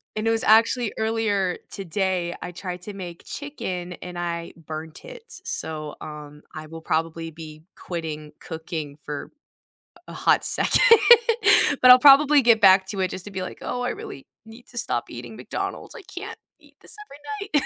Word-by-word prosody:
And 215 +1 -2
it - - +3
was 225 0 0
actually 225 +1 +3
earlier 220 -4 0
today 185 -2 -2
I 180 - -6
tried 180 0 -7
to 210 - -7
make 175 -3 -9
chicken 185 -12 -6
and 180 0 -9
I 170 -1 -4
burnt 160 -1 -9
it, - - -11
so, 155 - -5
um, 150 -1 -10
I 155 0 -8
will 165 +1 -10
probably 165 +1 -2
be 155 -1 -11
quitting 155 -3 -6
cooking 160 -3 -6
for 145 -1 -6 0.8
a - - -9
hot - - +2
second, - - +2 1.0
but 255 - +10
I'll 250 - +9
probably 285 +2 +7
get 230 -3 +4
back 190 -1 +6
to 195 0 -5
it 185 - 0
just 185 - -7
to 205 - -9
be 190 - -5
like, 185 - -8
"Oh, 245 - -4
I 245 - -1
really 135 - -8 0.2
need 225 +2 -14
to 245 - -13
stop 240 - -2
eating - - -9
McDonald's. - - -6
I 485 - -9
can't 390 +4 -9 0.2
eat - - -23
this - - -10
every 405 +8 -8
night." 295 - +3
185 Hz, 175 wpm, -23 LUFS, 160-230 Hz, 1.0 s, but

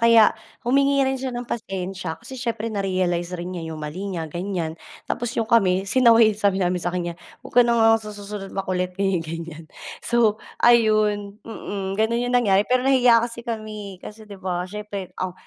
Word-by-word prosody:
Kaya 230 -2 +6 0.3
humingi 275 +2 +3
rin 265 - +1
siya 260 0 -4
ng 240 0 -5
pasensya 190 -6 -4
kasi 265 - -9
siyempre 230 -3 -3
narealize 185 -3 -1
rin 175 +1 -5
niya 165 -2 -5
yung 155 - -7
mali 180 +7 -5
niya 165 -3 -3
ganyan, 175 -1 -3 0.3
tapos 240 -1 -2
yung 225 - +1
kami, 195 -5 +3
sinaway, 230 -2 +5
sabi 200 -2 +1
namin 180 0 +1
sa 175 - 0
kaniya, 175 -1 -3 0.3
"Wag - - -12
ka 245 - +8
na 235 - +2
nga 225 - +5
sa 215 - -7
susunod 205 -1 -7
makulit." 185 -2 -2
Ganyan-ganyan. 165 -4 -2 0.4
So 230 -3 +3 0.2
ayun, 215 -3 +3
mm, 195 -3 -5
gano'n 235 +3 +1
yung 245 - -1
nangyari. 205 -4 +3
Pero 255 0 +2
nahiya 250 -4 +5
kasi 235 0 -6
kami 215 -4 -5
kasi, 215 0 -10
'di 200 - -9
ba 180 -1 -3
siyempre 205 -2 -6
ang 185 -1 -3
205 Hz, 180 wpm, -23 LUFS, 185-230 Hz, 0.4 s, ka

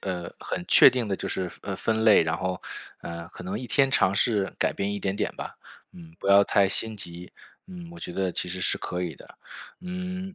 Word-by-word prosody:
呃， 90 -2 -4
很 90 - -4
确 - - +9
定 125 -3 -1
地 100 - -1
就 - - -4
是 90 -2 -3
呃， 95 - -5
分 110 +1 0
类。 110 -5 +7
然 80 0 -1
后， 90 0 -2 0.4
呃， 85 0 -7
可 90 - -11
能 95 +3 -3
一 130 - -6
天 135 +1 +3
尝 95 -7 +3
试 100 -2 +2
改 - - +1
变 100 +1 -2
一 100 - -3
点 95 -1 -2
点 105 - -1
吧， - - -6 0.4
嗯， 80 -2 -13
不 - - -7
要 100 0 +7
太 100 0 +3
心 110 +3 -1
急。 90 -2 -6 0.4
嗯， 175 -2 -10
我 170 - -11
觉 90 - -6
得 95 -2 -1
其 90 - -2
实 95 +1 -4
是 - - +1
可 90 0 -4
以 85 -4 -4
的， - - -16 0.4
嗯。 185 +1 -5
100 Hz, 245 characters per minute, -26 LUFS, 90-120 Hz, 0.4 s, 确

